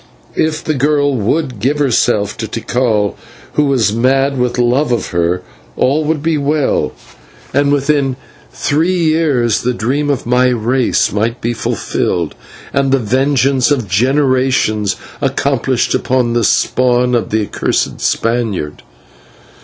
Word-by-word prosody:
If 155 0 -1
the 155 - -1
girl 145 0 +1
would 125 +2 -1
give 135 +7 0
herself 110 -7 +1
to 110 - -3
Tikal, 110 -2 -1 0.4
who 150 - +2
was 125 -7 +2
mad 135 +4 +2
with 125 0 0
love 125 +3 +2
of 120 - -1
her, 85 +1 0 0.3
all 145 +4 +2
would 150 -1 -1
be 160 -2 +1
well, 145 0 0 0.6
and 140 +1 +2
within 140 -2 +1 0.4
three 165 +5 0
years 155 - +1
the 125 0 -1
dream 140 +6 -1
of 140 -4 -1
my 125 +2 +3
race 125 +1 +1
might 115 +4 -1
be 120 +1 -2
fulfilled, 90 -6 -2 0.4
and 140 -1 +1
the 135 - +4
vengeance 130 +2 +1
of 130 -7 0
generations 130 -1 +1 0.3
accomplished - - 0
upon 125 -2 0
the 120 -1 +1
spawn 125 +3 +2
of 120 -2 0
the 110 0 0
accursed - - -2
Spaniard. 115 -10 -1
125 Hz, 135 wpm, -15 LUFS, 115-145 Hz, 0.6 s, the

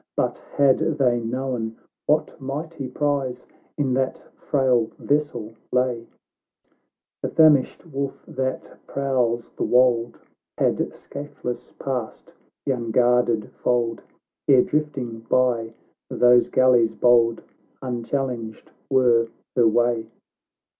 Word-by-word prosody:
But, - - 0 0.2
had 140 -2 +5
they 130 -6 +1
known 120 -1 -3 0.3
what 150 +1 +1
mighty 145 +1 -5
prize 135 -2 -2 0.3
In 135 -4 0
that 130 0 -1
frail 130 -5 +1
vessel 140 -7 -1 0.2
lay, 125 -2 0 1.1
The - - -2
famished 155 -3 +4
wolf 140 -3 -5
that 130 0 -4
prowls 125 -4 -1
the - - -4
wold, 120 -2 +3 0.4
Had - - 0
scathless 135 -4 -7
passed 125 -5 -5 0.3
the 140 - +1
unguarded 120 -2 +1
fold, 120 -2 -1 0.5
Ere, 130 -3 +6
drifting 140 -7 -2
by 115 -1 0 0.3
these 125 0 +4
galleys 125 -3 +4
bold, 115 -1 +3 0.4
Unchallenged 120 -2 -4 0.2
were 120 -4 +3 0.3
her 120 -2 +5
way 115 0 +1
125 Hz, 100 wpm, -23 LUFS, 115-135 Hz, 1.1 s, Ere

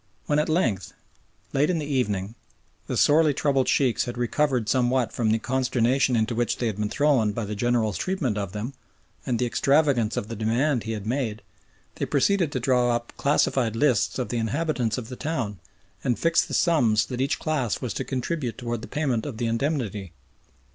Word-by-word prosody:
When 150 0 +2
at 150 - 0
length, 115 - 0 0.6
late 145 +3 +2
in 180 - +1
the 155 - -3
evening, 105 -8 -1 0.5
the - - -2
sorely 150 -1 +4
troubled 135 -3 +1
Sheikhs 125 -3 +2
had 120 -1 -6
recovered 125 -1 0
somewhat 125 0 +1
from 115 -3 0
the 110 - +3
consternation 130 +1 +1
into 110 +1 +1
which 120 +1 0
they 120 - -2
had 110 -3 -1
been 105 0 -1
thrown 130 -6 +2
by 115 0 -3
the 105 - -4
General's 110 -4 0
treatment 165 - -1
of 100 -3 -3
them, 105 +6 -5 0.5
and 120 - +1
the 125 - 0
extravagance 135 -3 +2
of 100 - -2
the 115 - -5
demand 120 +5 0
he 115 - -2
had 105 -2 -5
made, 115 -3 -2 0.5
they - - -2
proceeded 195 -7 +2
to 130 - 0
draw 125 -1 +2
up 120 0 -5
classified 130 -5 +1
lists 125 -3 +2
of 125 - -2
the 120 - -1
inhabitants 125 0 -1
of 120 -2 -6
the 125 - -6
town 120 - -3 0.4
and 120 - +1
fix 165 0 +3
the - - -4
sums 120 - +3
that 125 -1 -4
each 140 +3 +1
class 135 -9 -1
was 125 -6 -3
to - - -3
contribute 130 -2 -3
towards 120 -2 -3
the - - -8
payment 135 -7 -1
of 130 -6 -6
the 120 - -1
indemnity. 115 - -2
125 Hz, 195 wpm, -25 LUFS, 110-140 Hz, 0.6 s, sorely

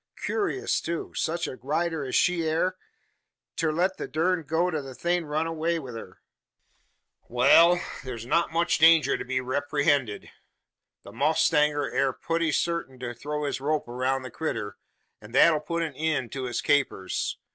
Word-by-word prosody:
Kewrious, 400 -2 -1
too; 170 0 -4
sech 170 +1 -1
a 130 - -6
rider 160 +3 -1
as 130 - -3
she 180 -2 +2
air, 160 +3 0 0.8
ter 160 -2 0
let 180 +4 0
the - - -5
durned 165 +3 0
goat 170 +3 +1
o' 155 - 0
a 135 -2 -9
thing 175 +2 0
run 155 +2 -1
away 165 +1 -1
wi' 135 -6 -7
her. 115 -1 -10 1.1
Wal! 140 +8 +6 0.3
thur's 120 -3 -7
not 170 +7 +1
much 170 +1 +1
danger 160 0 +6
to - - -4
be 130 0 -1
reeprehended. 140 -3 0 0.7
The - - -11
mowstanger 145 +3 +2
air 135 -1 +1
putty 165 +2 -1
sartin 170 -5 -1
to 125 -1 -5
throw 150 +5 -4
his 140 -2 -2
rope 150 0 -1
aroun' 130 +2 -1
the 130 - -8
critter, 110 -9 -4 0.5
an 105 +2 -13
that 165 +5 +6
'll 155 - 0
put 170 +2 -2
an 155 -3 -4
eend 155 -6 -1
to 130 -2 -4
its 120 - -2
capers. 140 -10 0
150 Hz, 170 wpm, -26 LUFS, 130-165 Hz, 1.1 s, Wal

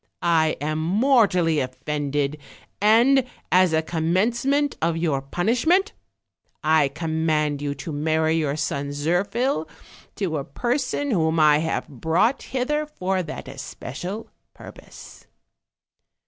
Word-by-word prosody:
I 160 -2 +2
am 155 +2 -2
mortally 185 - +3
offended, 145 +2 -2 0.4
and, 235 +6 +5 0.3
as 185 -1 +5
a 160 0 +1
commencement 230 - 0
of 165 0 +1
your 155 -5 0
punishment, 240 - +1 0.7
I 155 -2 +4
command 155 -1 -1
you 145 -1 -2
to 140 +4 -7
marry 160 +2 +1
youl 150 -2 -1
son 145 -2 -2
Zir 165 +6 +1
phil 235 - -1 0.5
to 175 -6 -2
a - - -4
person 255 - -2
whom 160 -5 +1
I 150 -1 +5
have 160 +1 -2
brought 160 - +1
hither 295 +4 -2
for 190 -9 -2
that 160 -5 -7
especial 140 - -7 0.2
purpose." - - -13
160 Hz, 120 wpm, -23 LUFS, 150-220 Hz, 0.7 s, and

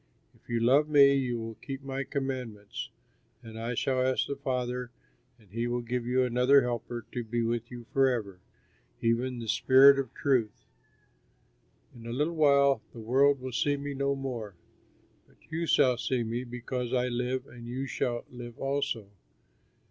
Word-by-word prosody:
"If - - -28
you 120 -1 0
love 135 +6 +4
me 140 -2 +7
you 130 -3 0
will 115 0 -5
keep 135 0 -6
my 135 0 -3
commands, 130 -7 -5 0.5
and 110 -1 -9
I 115 +2 -3
shall 130 +2 0
ask 130 0 +1
the 140 - -4
Father 125 -2 -3 0.5
and 105 -5 -24
he 115 +3 -2
will 120 0 -2
give 120 0 -3
you 130 +1 +2
another 125 +3 +4
Helper 120 -1 -4
to 120 - -3
be 115 +1 -2
with 115 0 -2
you 120 -1 -9
forever, 120 -9 +1 0.6
even 120 +2 0
the 115 -1 -6
Spirit 135 +4 +6
of 135 - -3
truth. 125 - 0 1.3
"In 115 -1 -11
a - - -4
little 150 +6 0
while 140 -3 +4
the 115 - -10
world 135 +4 +3
will 130 0 -5
see 145 +4 +1
me 140 0 -5
no 140 0 0
more; 120 -7 -5 0.7
but - - -26
you 165 +1 -2
shall 125 -5 +4
see 125 0 -1
me, 120 +3 -3
because 125 +1 -4
I 125 0 +1
live 125 +1 -2
and 120 -2 -11
you 130 +3 -3
shall 120 -1 -2
live 120 -1 -9
also. 135 -6 -2
125 Hz, 170 wpm, -29 LUFS, 120-135 Hz, 1.3 s, me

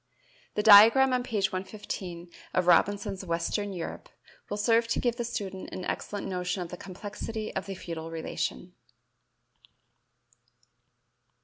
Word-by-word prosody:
The 210 - 0
diagram 225 +6 +8
on 250 - +2
page 210 -6 -1
115 185 -3 -6 0.2
of 185 - +2
Robinson's 195 +2 +2
"Western 180 +4 -1
Europe" 185 - -6 0.4
will 205 - -3
serve 230 +2 +3
to 230 - 0
give 240 -1 0
the 240 - -1
student 200 -5 -5
an 185 - -5
excellent 205 -1 -4
notion 180 0 -2
of 170 - -9
the 180 - -6
complexity 210 +4 -6
of 190 - -3
the 195 - -5
feudal 165 -2 -6
relation. 160 - -4
195 Hz, 130 wpm, -28 LUFS, 180-215 Hz, 0.4 s, diagram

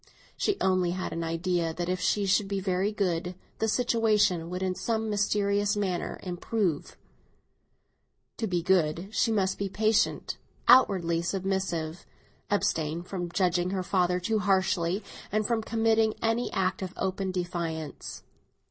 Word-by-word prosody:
She 410 -2 0
only 185 -2 +2
had 185 - -3
an 165 - -3
idea 165 0 -1
that 175 0 -3
if 185 0 -1
she 205 +2 +1
should 195 +1 +2
be 200 0 -1
very 190 +1 0
good, 180 -3 -1 0.2
the 220 - +1
situation 215 -7 +2
would 180 +1 -3
in 185 -1 0
some 220 +2 -2
mysterious 205 0 +1
manner 185 -4 -2
improve. 180 -2 -2 1.4
To 225 - -1
be 175 -3 -1
good, 175 0 +1
she 225 - +2
must 195 -3 +1
be 200 -1 -1
patient, 215 +2 +1 0.3
respectful, 180 -4 +3 0.6
abstain 165 -5 0
from 180 -1 -4
judging 180 -1 +1
her 190 -1 -2
father 180 -1 +1
too 215 +4 0
harshly, 190 -1 +1 0.3
and 215 0 +1
from 230 0 +1
committing 225 0 +2
any 225 +2 0
act 190 0 0
of 185 -1 -4
open 190 0 -1
defiance. 170 -4 -4
190 Hz, 140 wpm, -28 LUFS, 175-205 Hz, 1.4 s, respectful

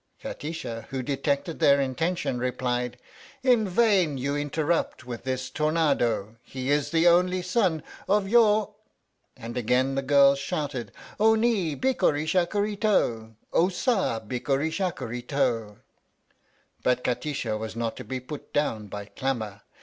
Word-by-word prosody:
Kati 150 - -6
sha, 115 -9 -5
who 130 -1 -3
detected 140 +4 -1
their 140 0 +5
intention, 140 0 -1
replied: 125 -1 -2 0.5
In 245 -5 +4
vain 185 -8 +3
you 140 +3 -1
interrupt 145 -1 -1
with 120 -1 -7
this 130 0 -2
tornado! 140 -9 +1
He 130 +1 -4
is 145 -1 +1
the 165 +1 +3
only 180 +1 +4
son 180 -5 +1 0.3
of 200 0 +3
your 215 -1 +4 0.6
and 115 +1 -7
again 125 +3 +1
the 135 - 0
girls 140 0 +5
shouted: 140 -6 -3 0.3
O 220 +1 +5
ni, 220 -9 +1
bikkuri 155 - +1
shakkuri 200 +5 0
to! 115 - +1 0.2
O 175 +3 +4
sa, 190 - 0
bikkuri 135 +7 -1
shakkuri 155 - -3
to! 115 -7 0 1.0
But 125 0 +1
Kati 125 +4 -1
sha 110 -5 -2
was 110 0 -5
not 115 -1 -2
to - - -6
be 130 0 -4
put 140 +3 -9
down 115 -8 0
by 100 0 -6
clamour. 110 -3 -3
140 Hz, 140 wpm, -26 LUFS, 125-175 Hz, 1.0 s, their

